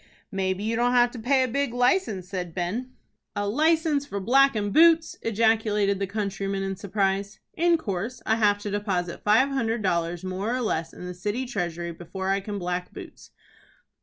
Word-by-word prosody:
"Maybe 190 0 -1
you 225 +1 0
don't 245 +1 +2
have 245 -1 +4
to 245 - -8
pay 260 +3 +3
a - - 0
big 265 0 -1
license," 245 - +1
said 180 -3 -5
Ben. 215 +9 -3 0.4
"A 205 0 -1
license 310 +4 +2
for 200 -8 -5
blackin' 230 -1 +3
boots?" 330 +2 +5
ejaculated 215 -3 +2
the 195 - -1
countryman, 195 -1 -2
in 195 0 -2
surprise. 200 +1 -1
"In 340 0 +3
course. 225 - -4
I 220 - +2
have 205 -2 +3
to 205 - -3
deposit 190 -4 -2
five 220 +6 +4
hundred 230 -5 -1
dollars, 170 -2 -1
more 190 +6 -2
or 255 - -1
less, 165 -8 -1
in - - -10
the 180 - -5
city 205 +8 -3
treasury, 175 -7 -3
before 190 +3 -5
I 195 - +2
can 205 +1 -5
black 180 -1 -3
boots." - - -11
205 Hz, 180 wpm, -26 LUFS, 190-245 Hz, 0.4 s, boots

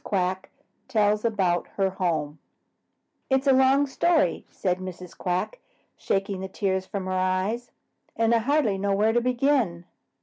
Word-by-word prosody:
QUACK 185 -2 -1 0.4
TELLS 210 -3 +1
ABOUT 190 -6 +1
HER 195 -1 +1
HOME 160 -5 -2 0.9
"It's 265 +1 +2
a 270 - +5
long 265 +2 +4
story," 300 - +1
said 180 -1 -2
Mrs. 185 -1 -8
Quack, 185 - -2 0.4
shaking 195 0 -2
the 190 - -4
tears 190 -1 -2
from 200 -3 -4
her 185 - -3
eyes, 185 +6 -1 0.5
"and 230 0 +2
I 230 - +4
hardly 235 -5 +1
know 200 0 +1
where 215 +2 +2
to 240 - +2
begin." 245 -8 +1
200 Hz, 145 wpm, -25 LUFS, 185-240 Hz, 0.9 s, a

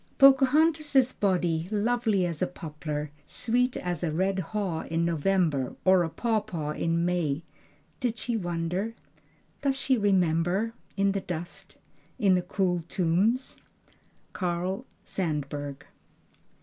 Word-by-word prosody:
"Pocahontas' 275 0 +5
body, 175 -4 +1
lovely 215 -2 +1
as 170 -3 -3
a 185 - +2
poplar, 150 -3 -5 0.2
sweet 250 +2 0
as 175 -3 -3
a 165 - 0
red 190 +4 0
haw 190 -2 -2
in 165 +1 +1
November 165 -5 +1
or 185 -1 +6
a 165 - 0
pawpaw 190 -8 -1
in 165 +2 0
May 170 -4 0 0.6
did 240 -3 -1
she 235 +1 -2
wonder? 180 +3 -2 0.7
does 275 -1 +1
she 260 -3 +2
remember 190 +2 +2 0.2
in 195 0 +3
the 195 0 -2
dust 175 -1 -6 0.4
in 195 -3 +4
the 180 - +3
cool 180 -1 0
tombs?" 195 +10 +1 0.8
Carl 180 +1 -2 0.2
Sandburg. 145 -5 -3
180 Hz, 120 wpm, -28 LUFS, 165-220 Hz, 0.8 s, or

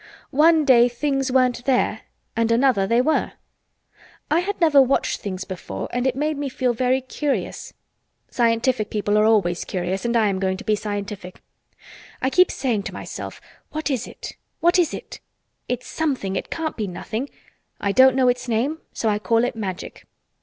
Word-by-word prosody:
One 315 +2 +4
day 245 -3 +6
things 270 +1 -1
weren't 250 -2 +2
there 260 -2 +1 0.3
and 230 0 +1
another 230 -5 +3
they 235 +3 +3
were. 310 +4 0 1.0
I 320 - +4
had 405 +3 -3
never 310 -5 +6
watched 265 +1 +1
things 190 -3 -4
before 175 - -6
and 245 +2 0
it 255 - 0
made 300 +2 -1
me 285 -1 -2
feel 255 -1 0
very 255 +2 +1
curious. 275 +2 -3 0.5
Scientific 230 -1 +1
people 205 -1 0
are 210 0 +4
always 195 -6 +2
curious 185 +1 -3
and 235 0 +1
I 220 -2 +3
am 190 -1 -1
going 190 -1 0
to - - -9
be 215 - +2
scientific. 205 -3 -6 0.8
I 260 - 0
keep 365 +4 +5
saying 240 -6 -1
to - - -12
myself, - - -7 0.3
'What 310 -1 -2
is 255 -3 -2
it? - - -9 0.3
What 345 +2 +4
is 345 - +2
it?' - - -8 0.5
It's 250 0 -2
something. 265 -12 -2
It - - -4
can't 325 -1 -3
be 215 -3 -3
nothing! 220 +8 -5 0.5
I 200 - 0
don't 260 +4 +6
know 260 -1 +3
its 250 +1 0
name 250 +8 0
so 225 - -2
I 210 -1 +1
call 225 +4 +2
it 245 - -1
Magic. 190 -5 -6
245 Hz, 180 wpm, -22 LUFS, 210-270 Hz, 1.0 s, day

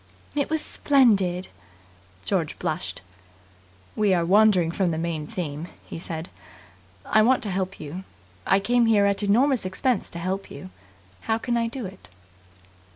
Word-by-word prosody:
"It 285 -1 -1
was 315 -1 0
splendid!" 200 -10 +2 0.8
George - - -1
blushed. - - -4 0.9
"We 205 -3 +3
are 170 -1 +1
wandering 190 -3 +4
from 185 +1 0
the 160 - -2
main 160 -2 -3
theme," 155 -2 -4 0.2
he - - -7
said. 165 0 -5 0.8
"I 215 - +4
want 255 +3 +3
to 205 - -2
help 190 +1 -3
you. 160 +6 -7 0.4
I 195 - +4
came 235 +3 +2
here 210 -3 +4
at 200 0 +2
enormous 245 +6 +3
expense 200 +5 -1
to - - -8
help 185 +3 -3
you. 115 -10 -10 0.6
How 220 - +3
can 240 +1 -2
I 230 -1 +1
do 245 0 -5
it?" 190 0 -11
195 Hz, 155 wpm, -25 LUFS, 175-230 Hz, 0.9 s, wandering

